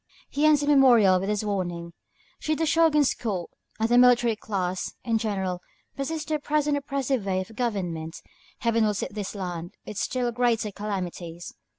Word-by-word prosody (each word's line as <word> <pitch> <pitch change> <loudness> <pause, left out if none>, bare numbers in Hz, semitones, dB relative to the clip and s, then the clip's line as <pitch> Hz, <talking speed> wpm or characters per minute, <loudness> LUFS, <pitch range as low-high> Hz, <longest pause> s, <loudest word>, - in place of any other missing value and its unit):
He 295 +2 +3
ends 300 -2 +5
his 290 - -2
memorial 240 -10 +6
with 195 +2 -3
this 210 0 0
warning: 175 -4 -3 0.5
"Should 310 0 -1
the 325 - 0
Shōgun's 315 -3 +4
court, 195 -7 -4 0.3
and 220 - +2
the 240 +1 +5
military 245 -2 +5
class 185 -4 -3
in 225 -2 +1
general, 190 -5 -2 0.3
persist 310 +3 -4
in 305 - +2
the - - -19
present 295 0 +1
oppressive 275 -4 -1
way 190 -1 0
of 215 +4 -7
government, 180 -9 -3 0.4
Heaven 230 -1 +2
will 210 -1 +2
visit 195 -1 -4
this 205 -1 -5
land 175 -3 -5
with 210 - -5
still 250 -2 -1
greater 235 -3 +1
calamities. 180 -4 -5
220 Hz, 175 wpm, -26 LUFS, 185-270 Hz, 0.5 s, memorial